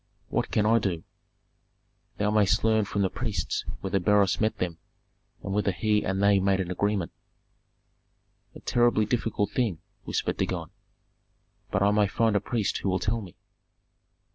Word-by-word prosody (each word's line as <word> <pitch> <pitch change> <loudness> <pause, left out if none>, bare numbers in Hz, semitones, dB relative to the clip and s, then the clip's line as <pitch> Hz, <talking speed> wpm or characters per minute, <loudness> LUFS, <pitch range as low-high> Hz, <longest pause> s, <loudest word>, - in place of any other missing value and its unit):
"What - - -1
can 105 - +1
I 115 +2 +4
do?" 90 -6 -2 1.1
"Thou 105 0 +1
mayst 105 -3 +3
learn 110 -1 +3
from 100 0 -1
the 95 - +1
priests 115 -5 -2 0.2
whether 95 0 0
Beroes 100 +2 +3
met 110 0 +1
them, 85 -3 -3 0.6
and 100 - -3
whether 105 -1 +1
he 105 +3 +1
and 95 +1 -1
they 100 -1 +5
made 95 0 +2
an 90 -1 -2
agreement." 100 -1 -1 1.4
"A - - -11
terribly 120 -3 +2
difficult 110 -2 -1
thing," 115 -9 0 0.3
whispered - - -2
Dagon. - - -2 1.0
"But 100 -1 +1
I 100 - +4
may 105 -1 +3
find 110 +2 +1
a - - +4
priest 110 -2 -1
who 100 - -1
will 95 - +1
tell 110 +5 -1
me." 95 -4 -11
105 Hz, 160 wpm, -27 LUFS, 95-110 Hz, 1.4 s, they